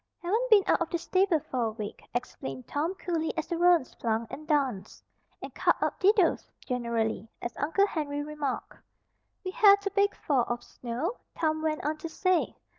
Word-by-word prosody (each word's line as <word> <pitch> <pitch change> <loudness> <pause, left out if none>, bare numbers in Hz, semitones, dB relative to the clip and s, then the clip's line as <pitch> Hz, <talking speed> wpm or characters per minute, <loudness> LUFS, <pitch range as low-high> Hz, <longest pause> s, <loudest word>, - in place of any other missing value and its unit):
"Haven't 445 +8 0
been 420 -4 +7
out - - +2
of 335 - 0
the 340 - 0
stable 370 -1 +2
for 255 -2 -3
a 220 - -1
week," 215 -2 -6
explained 135 - -4
Tom 320 +6 -2
cooly 330 -4 -2
as 320 - -1
the 345 - -3
roans 345 -4 +4
plunged 225 0 -2
and 305 +1 -8
danced, 270 - -1 0.4
and - - -7
"cut - - +3
up - - -1
didos" 390 -2 +3 0.2
generally, 230 -3 -1
as 235 - -5
Uncle 325 +8 +2
Henry 290 -6 -3
remarked. 295 -3 -4 0.7
"We 370 - -2
had 400 0 +6
a 400 - 0
big 400 +1 +2
fall 265 -5 +1
of 240 0 -3
snow," 255 - -4 0.2
Tom 315 -1 +1
went 310 -2 -1
on 305 +1 0
to 325 +2 -6
say. 370 +2 +1
310 Hz, 185 wpm, -29 LUFS, 250-365 Hz, 0.7 s, been